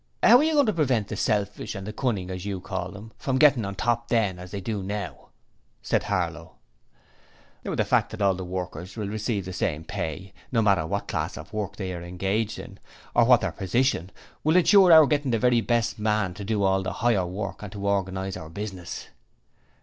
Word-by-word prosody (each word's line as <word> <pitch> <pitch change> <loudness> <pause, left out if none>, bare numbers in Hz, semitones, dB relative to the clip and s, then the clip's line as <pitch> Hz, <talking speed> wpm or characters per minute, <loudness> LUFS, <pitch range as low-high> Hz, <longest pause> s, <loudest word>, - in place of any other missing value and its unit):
'How 245 - +9
are 275 - +3
you 320 +1 +2
goin' 290 -2 +5
to 215 - +1
prevent 130 - +1
the - - -3
selfish 105 0 -1
and 100 +2 -6
cunnin', 105 -8 -1
as 90 -1 -5
you 100 -2 -3
call 95 +1 -5
'em, 110 +2 -11
from 130 -1 0
gettin' 140 -5 +5
on 100 0 -5
top 120 +3 0
THEN 105 -6 +1
as 90 0 -9
they 100 - -5
do 105 +1 -3
now?' 95 -6 -5 0.5
said - - 0
Harlow. - - -2 1.1
'The - - -1
fact - - +2
that - - -8
all 100 -2 +3
workers 90 0 -5
will 105 -2 -3
receive 105 -1 -2
the 95 - -6
same 80 -3 -2
pay, 95 +4 -5 0.2
no 115 -3 +2
matter 95 -7 +3
what 100 +2 -3
class - - -3
of - - -10
work 105 -1 -3
they 95 -3 -4
are 85 - -6
engaged 95 +5 -2
in, - - -10 0.3
or - - +5
what - - +6
their - - -1
position, 95 -2 0 0.3
will 155 +2 +3
ensure 185 0 +6
our 160 -2 +9
getting 145 -1 0
the 115 - +2
very 120 0 +3
best 115 -2 0
man 105 -3 0
to 100 +2 -8
do 105 0 0
all 95 0 +3
the 95 - -3
higher 110 -6 +1
work 100 +2 -5
and 105 -2 -7
to 100 -1 -5
organize 95 -1 -1
our 80 - -8
business.' 95 -1 -6
100 Hz, 205 wpm, -26 LUFS, 95-115 Hz, 1.1 s, How